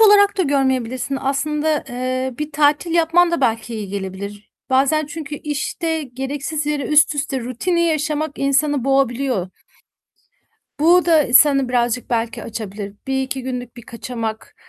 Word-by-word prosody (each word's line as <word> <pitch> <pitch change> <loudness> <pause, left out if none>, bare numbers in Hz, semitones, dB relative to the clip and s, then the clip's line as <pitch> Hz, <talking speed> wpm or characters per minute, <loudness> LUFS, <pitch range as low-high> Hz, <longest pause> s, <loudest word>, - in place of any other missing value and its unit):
olarak 410 -1 +6
da - - +4
görmeyebilirsin. 265 -2 0
Aslında, 300 +3 0
eee, 255 +1 -2
bir 300 0 -4
tatil 295 +3 +2
yapman 340 +1 +4
da 340 - -1
belki 230 -2 0
iyi 210 -3 -5
gelebilir. 200 +1 -6 0.2
Bazen 280 +3 +2
çünkü 300 -1 -6
işte 310 +2 -3
gereksiz 280 +4 -4
yere 295 -1 -1
üst 305 +1 +4
üste 280 -2 -2
rutini 255 +9 -1
yaşamak 310 -2 -1
insanı 275 -1 +1
boğabiliyor. 265 -7 +1 1.3
Bu 345 +3 +5
da 325 -3 +5
ı 240 - -2
seni 275 -2 +6
birazcık 245 -1 0
belki 230 -1 -1
açabilir. 205 -2 -6
1-2 265 0 -2
günlük 250 -2 -5
bir 240 - -10
kaçamak, 230 -1 -6
275 Hz, 140 wpm, -20 LUFS, 245-305 Hz, 1.3 s, olarak